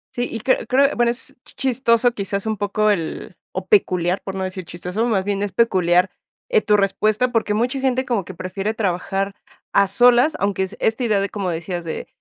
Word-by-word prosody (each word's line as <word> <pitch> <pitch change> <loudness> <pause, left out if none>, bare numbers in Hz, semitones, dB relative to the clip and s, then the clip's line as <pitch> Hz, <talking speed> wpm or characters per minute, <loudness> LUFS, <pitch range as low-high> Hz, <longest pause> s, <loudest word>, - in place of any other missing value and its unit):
Sí, 245 0 -1
y 225 - -5
creo 260 - +1
creo, 275 +2 +3
bueno, 240 0 +2
es 240 +2 -1
chistoso, 245 -2 +1
quizás 200 -2 -3
un 220 - -1
poco 210 +1 +1
el 165 -5 -4 0.2
o - - -4
peculiar, 180 - +2
por 195 -1 -6
no 190 - -2
decir 185 0 -5
chistoso, 180 +6 -4
más 195 -5 0
bien, 200 -1 -1
es 205 -2 -2
peculiar, 185 -5 +3 0.4
eh, 455 -3 +3
tu 210 -1 +3
respuesta, 215 +4 +1
porque, 220 -3 0
mucha 245 +5 0
gente 260 -1 0
como 235 -6 0
que 185 +1 -10
prefiere 195 +5 -3
trabajar 195 0 -1 0.4
a 200 - +4
solas, 245 +8 +4
aunque 200 -1 0
es 190 - -6
esta 225 +3 0
idea 215 -4 +2
de, 195 - -1
como 195 -3 -3
decías, 175 +1 -4
de, 160 - -5
205 Hz, 200 wpm, -21 LUFS, 190-240 Hz, 0.4 s, a